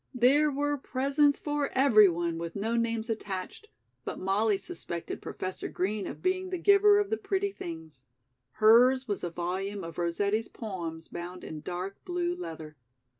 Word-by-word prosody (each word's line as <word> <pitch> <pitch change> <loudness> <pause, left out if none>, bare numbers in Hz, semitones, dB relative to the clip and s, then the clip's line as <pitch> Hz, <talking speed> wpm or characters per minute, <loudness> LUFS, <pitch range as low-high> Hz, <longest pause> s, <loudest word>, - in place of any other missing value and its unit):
There 275 +5 +4
were 290 0 -1
presents 280 +3 +2
for 295 -1 -1
everyone 195 -11 +4
with 170 0 -5
no 220 +3 -1
names 230 -1 0
attached, 205 - -5 0.4
but - - -5
Molly 200 +2 +1
suspected 175 - -6
Professor 185 0 -5
Green 200 +2 -2
of - - -8
being 370 0 0
the 365 - -2
giver 405 +3 +6
of 410 0 0
the 440 - +1
pretty 400 -1 -1
things. 160 - -9 0.5
Hers 250 +4 +5
was 205 -2 -3
a 175 - -1
volume 190 +4 -3
of 165 0 -7
Rossetti's 200 +6 0
poems 170 -7 -6
bound 180 +1 -7
in 155 -1 -7
dark 180 +4 -5
blue 355 -1 -1
leather. 160 - -8
215 Hz, 155 wpm, -29 LUFS, 175-290 Hz, 0.5 s, giver